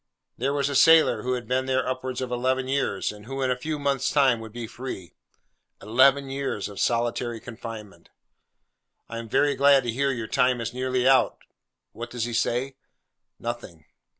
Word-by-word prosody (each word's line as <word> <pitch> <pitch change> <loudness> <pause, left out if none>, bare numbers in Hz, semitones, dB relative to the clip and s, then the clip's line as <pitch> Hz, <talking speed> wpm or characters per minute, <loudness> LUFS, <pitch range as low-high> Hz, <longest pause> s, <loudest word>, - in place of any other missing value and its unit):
There 135 +3 -1
was 140 -1 0
a 145 - -3
sailor 160 +4 +6
who 125 0 -1
had 125 -1 -4
been 130 +1 0
there 130 -1 0
upwards 130 0 -3
of 130 -1 -4
eleven 130 +1 0
years, 135 -7 -1
and 105 +1 -13
who 135 +1 -3
in 130 - +1
a - - +1
few 150 +5 -4
months' 140 -2 0
time 135 -5 +3
would 110 -1 -9
be 120 +1 -6
free. 110 - -8 0.7
Eleven 135 +5 +4
years 135 -7 -3
of 100 -1 -9
solitary 120 0 0
confinement! 110 -3 -9 1.0
'I 115 - -6
am 115 -1 -8
very 145 +5 +3
glad 140 -1 +5
to 120 - -2
hear 140 +4 0
your 120 -4 -2
time 125 +2 +2
is 115 +1 -4
nearly 130 0 0
out.' 135 -1 +3 0.5
What 120 +1 -7
does 120 -2 -3
he 120 - -5
say? 125 +4 -1 0.6
Nothing. 115 -10 -7
125 Hz, 180 wpm, -25 LUFS, 115-135 Hz, 1.0 s, sailor